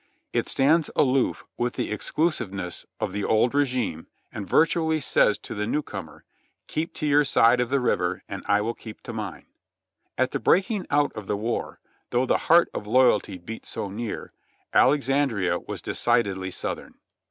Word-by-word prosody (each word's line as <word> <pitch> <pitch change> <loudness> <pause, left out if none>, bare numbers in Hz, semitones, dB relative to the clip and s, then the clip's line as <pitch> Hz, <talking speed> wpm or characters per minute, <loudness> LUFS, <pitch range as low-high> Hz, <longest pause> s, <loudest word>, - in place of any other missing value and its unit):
It - - 0
stands 155 +4 +3
aloof 130 -1 +2
with 120 0 -1
the - - -3
exclusiveness 105 - -2
of - - -2
the 105 - -2
old 110 +3 +2
regime 125 - 0 0.2
and 100 -3 -6
virtually 160 -1 +3
says 105 -6 +3
to - - -8
the 105 0 -2
new 150 +5 0
comer, 95 - -8 0.4
"Keep 160 +2 -3
to 155 - -3
your 145 0 +5
side 120 -3 +4
of 120 - -1
the 140 +1 +2
river 125 - 0
and - - -6
I 100 0 +3
will 115 +2 -1
keep 110 -2 -11
to 120 - -7
mine.'' 105 -5 -6 0.7
At 130 +1 +1
the - - -2
breaking 190 +1 +2
out 145 0 +2
of 105 -3 -8
the 105 - 0
war, 115 +3 -3 0.3
though 125 +2 +1
the - - +2
heart 170 +1 +7
of 105 - -5
loyalty 110 -5 +3
beat 110 +6 -9
so 100 - -4
near, 110 +2 -5 0.4
Alexandria 135 -10 +3
was - - -7
decidedly 95 -5 0
Southern. - - -5
120 Hz, 170 wpm, -25 LUFS, 105-145 Hz, 0.7 s, heart